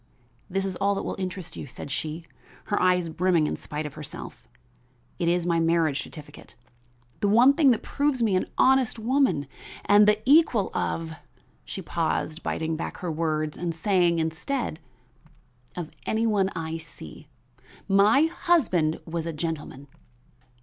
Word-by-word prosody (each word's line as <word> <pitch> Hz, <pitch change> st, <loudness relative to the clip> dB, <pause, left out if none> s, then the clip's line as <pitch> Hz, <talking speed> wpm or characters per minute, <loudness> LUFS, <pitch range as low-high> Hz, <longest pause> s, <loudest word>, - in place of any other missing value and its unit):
"This 195 Hz, +1 st, -1 dB
is 190 Hz, -1 st, -3 dB
all 200 Hz, 0 st, +1 dB
that -, -, -3 dB
will -, -, -3 dB
interest 185 Hz, -2 st, -5 dB
you," -, -, -7 dB
said 135 Hz, +2 st, -9 dB
she, 160 Hz, +3 st, -4 dB, 0.4 s
her 205 Hz, -, -1 dB
eyes 180 Hz, -1 st, +3 dB
brimming 170 Hz, -1 st, +2 dB
in -, -, -1 dB
spite 150 Hz, +1 st, -5 dB
of 150 Hz, -, -6 dB
herself. 150 Hz, -2 st, -9 dB, 0.7 s
"It 170 Hz, -, 0 dB
is 175 Hz, 0 st, +1 dB
my 170 Hz, -1 st, +2 dB
marriage 165 Hz, -3 st, +2 dB
certificate. 145 Hz, -1 st, -12 dB, 0.6 s
The 205 Hz, -, +1 dB
one 240 Hz, +7 st, +6 dB
thing 285 Hz, -1 st, +4 dB
that 235 Hz, -, +2 dB
proves 285 Hz, -4 st, 0 dB
me 210 Hz, -4 st, +2 dB
an 185 Hz, -, 0 dB
honest 260 Hz, -3 st, +3 dB
woman 225 Hz, -, +1 dB, 0.4 s
and 205 Hz, +1 st, +6 dB
the 210 Hz, 0 st, +4 dB
equal 270 Hz, -, +4 dB
of 165 Hz, -1 st, -2 dB, 0.3 s
" -, -, -36 dB
she -, -, -6 dB
paused, 160 Hz, +2 st, -2 dB
biting 160 Hz, 0 st, -2 dB
back 160 Hz, -, -5 dB
her 175 Hz, -2 st, -4 dB
words 155 Hz, -1 st, -1 dB
and 170 Hz, -2 st, -3 dB
saying 175 Hz, -1 st, +2 dB
instead 165 Hz, -, -2 dB, 1.0 s
"of 170 Hz, -3 st, -6 dB
any 220 Hz, +1 st, +1 dB
one 200 Hz, -4 st, +2 dB
I 165 Hz, -1 st, -3 dB
see. 160 Hz, -2 st, -10 dB, 0.6 s
My 205 Hz, +8 st, +5 dB
husband 250 Hz, -, +1 dB
was 165 Hz, 0 st, -4 dB
a 165 Hz, -, -3 dB
gentleman." 150 Hz, -3 st, -5 dB
175 Hz, 155 wpm, -26 LUFS, 160-210 Hz, 1.0 s, one